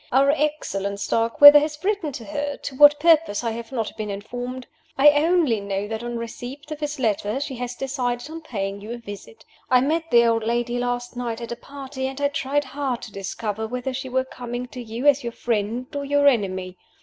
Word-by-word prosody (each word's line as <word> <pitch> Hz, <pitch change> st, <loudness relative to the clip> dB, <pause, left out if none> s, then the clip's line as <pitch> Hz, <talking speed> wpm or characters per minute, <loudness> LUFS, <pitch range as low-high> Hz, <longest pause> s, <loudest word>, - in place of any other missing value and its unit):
Our 275 Hz, +2 st, +5 dB
excellent 275 Hz, -10 st, -2 dB
Starkweather 260 Hz, +8 st, +7 dB
has 300 Hz, 0 st, -3 dB
written 395 Hz, -6 st, 0 dB
to 235 Hz, -, -7 dB
her 290 Hz, -1 st, -3 dB
to 270 Hz, -, -7 dB
what 290 Hz, +1 st, +7 dB
purpose 320 Hz, -9 st, +3 dB
I 230 Hz, -, -1 dB
have 230 Hz, +1 st, -7 dB
not 225 Hz, -5 st, -3 dB
been 215 Hz, -1 st, -4 dB
informed. 245 Hz, +5 st, -6 dB, 0.3 s
I 285 Hz, +2 st, +8 dB
only 300 Hz, -5 st, +2 dB
know 200 Hz, 0 st, -3 dB
that 220 Hz, +1 st, -4 dB
on 240 Hz, 0 st, -4 dB
receipt 245 Hz, +6 st, -8 dB
of 305 Hz, -, -5 dB
his 300 Hz, 0 st, -3 dB
letter 215 Hz, -1 st, 0 dB
she 280 Hz, -1 st, -4 dB
has 245 Hz, 0 st, -4 dB
decided 250 Hz, -2 st, -2 dB
on 325 Hz, +1 st, -7 dB
paying 200 Hz, -8 st, -4 dB
you 215 Hz, +3 st, -6 dB
a -, -, -5 dB
visit. 230 Hz, -, -11 dB, 0.2 s
I 255 Hz, -, +6 dB
met 325 Hz, +4 st, 0 dB
the 235 Hz, 0 st, +6 dB
old 230 Hz, -1 st, +2 dB
lady 240 Hz, +1 st, -1 dB
last 245 Hz, 0 st, -3 dB
night 240 Hz, -2 st, -3 dB
at 235 Hz, 0 st, -7 dB
a -, -, -2 dB
party, 270 Hz, 0 st, -6 dB
and 265 Hz, +1 st, -6 dB
I 285 Hz, 0 st, +2 dB
tried 285 Hz, 0 st, -1 dB
hard 270 Hz, -2 st, -3 dB
to 225 Hz, -, -8 dB
discover 210 Hz, +2 st, -4 dB
whether 250 Hz, +2 st, -4 dB
she 260 Hz, 0 st, -5 dB
were 260 Hz, +1 st, 0 dB
coming 245 Hz, -1 st, -6 dB
to 250 Hz, -, -8 dB
you 230 Hz, +3 st, -6 dB
as 285 Hz, -1 st, +5 dB
your 235 Hz, -1 st, -5 dB
friend 230 Hz, +2 st, -2 dB
or 285 Hz, -, -2 dB
your 285 Hz, 0 st, +2 dB
enemy. 185 Hz, -7 st, 0 dB
250 Hz, 210 wpm, -23 LUFS, 230-285 Hz, 0.3 s, I